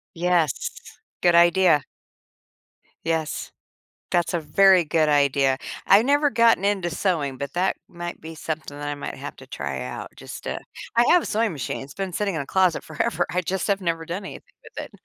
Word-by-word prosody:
Yes. 170 Hz, -3 st, +1 dB, 0.5 s
Good 175 Hz, -1 st, +4 dB
idea. 170 Hz, -3 st, +5 dB, 1.2 s
Yes. 160 Hz, -2 st, -2 dB, 0.6 s
That's 175 Hz, 0 st, +1 dB
a 170 Hz, -, +1 dB
very 180 Hz, +4 st, +5 dB
good 155 Hz, 0 st, +2 dB
idea. 140 Hz, -2 st, +3 dB, 0.3 s
I 195 Hz, -, +7 dB
never 285 Hz, +3 st, +3 dB
gotten 230 Hz, -3 st, +4 dB
into 195 Hz, -4 st, +1 dB
sewing, 155 Hz, -7 st, -1 dB
but 140 Hz, 0 st, -5 dB
that 185 Hz, +2 st, +1 dB
might 175 Hz, 0 st, -7 dB
be 160 Hz, +1 st, -9 dB
something 155 Hz, -2 st, -5 dB
that 145 Hz, -, -5 dB
I 145 Hz, -, -2 dB
might 145 Hz, -, -6 dB
have -, -, -7 dB
to -, -, -13 dB
try 70 Hz, -1 st, -4 dB
out 65 Hz, -, -6 dB
just -, -, -9 dB
to -, -, -3 dB, 0.4 s
I 235 Hz, -, +6 dB
have 350 Hz, -2 st, +6 dB
a -, -, -6 dB
sewing 225 Hz, 0 st, +1 dB
machine. 135 Hz, -4 st, -4 dB
It's 135 Hz, -, -10 dB
been 190 Hz, -2 st, -4 dB
sitting 200 Hz, -1 st, -1 dB
in -, -, -1 dB
a 140 Hz, -, -5 dB
closet 185 Hz, -3 st, +2 dB
forever. 160 Hz, +2 st, -1 dB
I 180 Hz, -, 0 dB
just 185 Hz, +1 st, -2 dB
have 200 Hz, -1 st, +1 dB
never 165 Hz, -3 st, -2 dB
done 190 Hz, +4 st, -4 dB
anything -, -, -8 dB, 0.2 s
with -, -, -8 dB
it. -, -, -19 dB
170 Hz, 190 wpm, -24 LUFS, 150-190 Hz, 1.2 s, I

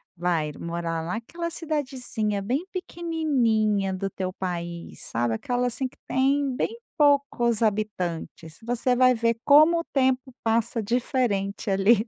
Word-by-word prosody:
vai 165 Hz, -3 st, 0 dB
morar 170 Hz, -1 st, -3 dB
naquela 235 Hz, -, -4 dB
cidadezinha 260 Hz, -, -2 dB
bem 260 Hz, -, -1 dB
pequenininha 250 Hz, -, 0 dB
do 195 Hz, +1 st, -2 dB
teu 185 Hz, -1 st, -4 dB
país 170 Hz, -2 st, -5 dB
sabe 115 Hz, -1 st, -1 dB
aquela 245 Hz, -, -1 dB
assim 255 Hz, +2 st, -2 dB
que -, -, -20 dB
tem 270 Hz, 0 st, +1 dB
bem 450 Hz, -, -1 dB, 0.2 s
poucos 280 Hz, -6 st, +3 dB
habitantes, 185 Hz, -7 st, -2 dB
você 245 Hz, +2 st, +1 dB
vai 255 Hz, 0 st, +5 dB
ver 230 Hz, -1 st, +1 dB
como 310 Hz, +4 st, +7 dB
o 335 Hz, -, -3 dB
tempo 260 Hz, -1 st, +1 dB
passa 230 Hz, +1 st, +1 dB
diferente 220 Hz, -4 st, -1 dB
ali. 200 Hz, +4 st, +4 dB
230 Hz, 130 wpm, -25 LUFS, 195-265 Hz, 0.2 s, como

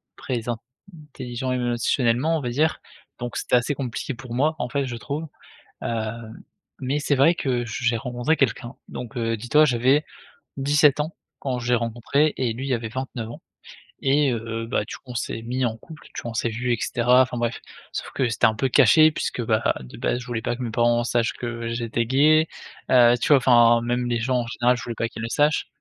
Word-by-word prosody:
très 120 Hz, -3 st, -4 dB
intelligents 130 Hz, -, -7 dB
émotionnellement, 125 Hz, +4 st, +1 dB
on -, -, -4 dB
va 125 Hz, -, -3 dB
dire. 155 Hz, +6 st, +1 dB, 0.4 s
Donc 120 Hz, -1 st, -5 dB
c'était -, -, +1 dB
assez 125 Hz, +4 st, 0 dB
compliqué 135 Hz, +1 st, -4 dB
pour 120 Hz, 0 st, -9 dB
moi, 150 Hz, +6 st, +1 dB
en 120 Hz, -, -2 dB
fait, 140 Hz, +1 st, -1 dB
je 125 Hz, -2 st, -5 dB
trouve. 150 Hz, +6 st, -5 dB, 0.6 s
Heu, 110 Hz, -2 st, -2 dB, 0.7 s
mais 135 Hz, +3 st, -1 dB
c'est 145 Hz, -, +1 dB
vrai 150 Hz, +6 st, +5 dB
que 125 Hz, -7 st, -1 dB
je 115 Hz, +2 st, -5 dB
j'ai 115 Hz, -1 st, +3 dB
rencontré 125 Hz, +6 st, -1 dB
quelqu'un. 120 Hz, -2 st, -1 dB
Donc, 125 Hz, 0 st, -8 dB
heu, 115 Hz, -1 st, 0 dB
dis-toi, 150 Hz, +8 st, +4 dB
j'avais 130 Hz, +2 st, +3 dB, 0.5 s
17 145 Hz, +1 st, +4 dB
ans 155 Hz, +3 st, -5 dB, 0.2 s
quand 130 Hz, -3 st, -2 dB
je 120 Hz, +1 st, 0 dB
l'ai -, -, +6 dB
rencontré 120 Hz, +6 st, 0 dB
et 125 Hz, -3 st, 0 dB
lui 130 Hz, +3 st, -3 dB
avait 115 Hz, -2 st, -2 dB
29 125 Hz, -2 st, -5 dB
ans 120 Hz, -, -10 dB, 0.6 s
et 140 Hz, +1 st, +3 dB
heu, 115 Hz, 0 st, -4 dB
bah, 110 Hz, -, -1 dB
du -, -, -8 dB
coup, -, -, -22 dB
on 125 Hz, -, -8 dB
s'est 115 Hz, -1 st, -3 dB
mis 125 Hz, +3 st, -2 dB
en 115 Hz, -2 st, 0 dB
couple, 155 Hz, +6 st, -13 dB
tu -, -, -4 dB
vois? 120 Hz, -, -5 dB
On -, -, -13 dB
s'est 115 Hz, +1 st, 0 dB
vus, 120 Hz, +2 st, -1 dB
et -, -, -4 dB
cetera. 125 Hz, +2 st, +4 dB
Enfin 125 Hz, -1 st, -3 dB
bref, 120 Hz, 0 st, -2 dB, 0.3 s
sauf -, -, -5 dB
que 130 Hz, -, +1 dB
c'était 115 Hz, -, -1 dB
un 110 Hz, -, +2 dB
peu 135 Hz, +5 st, 0 dB
caché 145 Hz, +5 st, +6 dB
puisque, 150 Hz, -, -3 dB
bah, 110 Hz, -1 st, +1 dB
de 60 Hz, -, -11 dB
base, -, -, 0 dB
je 125 Hz, -, -10 dB
voulais 120 Hz, -3 st, -3 dB
pas -, -, -1 dB
que -, -, -13 dB
mes 120 Hz, -, -3 dB
parents 120 Hz, +1 st, +2 dB
sachent 120 Hz, -1 st, +1 dB
que 115 Hz, -1 st, -5 dB
j'étais 115 Hz, 0 st, -1 dB
gay. 155 Hz, +5 st, +4 dB, 0.4 s
Heu, 120 Hz, -2 st, +7 dB
tu -, -, 0 dB
vois, 145 Hz, -, +7 dB
enfin, 120 Hz, -2 st, +5 dB
même 120 Hz, +1 st, -1 dB
les 120 Hz, -1 st, 0 dB
gens 125 Hz, +2 st, +1 dB
en -, -, -7 dB
général, 120 Hz, +1 st, +1 dB
je 125 Hz, -, -7 dB
voulais 120 Hz, -, -5 dB
pas 115 Hz, -, -1 dB
qu'ils 110 Hz, -, -8 dB
le 115 Hz, -, -3 dB
sachent. 150 Hz, +3 st, +2 dB
125 Hz, 220 wpm, -24 LUFS, 115-135 Hz, 0.7 s, Heu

